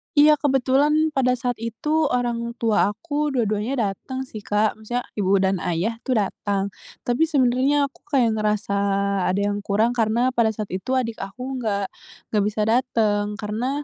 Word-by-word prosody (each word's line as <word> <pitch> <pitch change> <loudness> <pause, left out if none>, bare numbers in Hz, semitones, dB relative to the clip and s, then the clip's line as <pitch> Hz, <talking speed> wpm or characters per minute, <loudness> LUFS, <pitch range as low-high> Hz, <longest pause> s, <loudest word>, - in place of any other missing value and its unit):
Iya 300 0 +6
kebetulan 290 +3 +2
pada 255 -3 +2
saat 245 -1 -3
itu 300 +7 0
orang 235 -1 -1
tua 225 -4 +2
aku 300 +5 -2
dua-duanya 220 -1 0
datang 260 +6 -6
sih 220 -4 -8
Kak, 210 +1 0
maksudnya 240 +3 -3 0.2
ibu 195 0 +3
dan 190 -1 +1
ayah 190 +7 -2
tuh 255 -3 +1
datang, 200 0 -2 0.3
tapi 250 +7 +1
sebenarnya 275 +1 +2
aku - - -24
kayak 255 -6 +2
ngerasa 210 -1 0 0.5
ada 195 +2 +1
yang 205 - -2
kurang 210 +4 +1
karena 235 +2 +1
pada 235 -3 +2
saat 215 -2 -5
itu 190 +8 -2
adik 230 -3 -1
aku 250 +7 -5
nggak 205 -4 -1 0.5
nggak 210 -2 +2
bisa 215 +1 -2
dateng 215 -3 +1
karena 240 +7 -3
235 Hz, 160 wpm, -23 LUFS, 210-260 Hz, 0.5 s, Iya